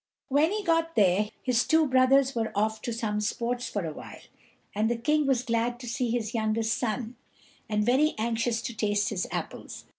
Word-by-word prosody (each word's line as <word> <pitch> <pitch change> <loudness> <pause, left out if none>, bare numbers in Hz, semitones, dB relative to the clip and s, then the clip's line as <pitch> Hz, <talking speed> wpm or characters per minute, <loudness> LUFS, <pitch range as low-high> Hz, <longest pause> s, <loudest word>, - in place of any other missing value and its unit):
When 295 +5 +3
he 420 0 -2
got 330 -2 +1
there 205 +1 +3
his 250 -2 +2
two 320 0 +3
brothers 265 0 +4
were 225 -2 -2
off 215 +1 0
to 240 - -3
some 215 -2 -2
sports 240 +3 -2
for 205 -4 -3
a 155 - -4
while; - - -10 0.6
and 215 +2 +1
the 240 - +1
King 300 +4 +1
was 255 -3 +2
glad 240 0 -1
to 245 - -8
see 240 +1 -1
his 225 -2 -2
youngest 220 0 0
son, 235 0 -3 0.5
and 210 -1 +1
very 275 +6 +3
anxious 230 +1 -1
to 240 -3 -5
taste 205 -1 0
his 190 -4 -2
apples. - - -6
235 Hz, 190 wpm, -27 LUFS, 215-260 Hz, 0.6 s, brothers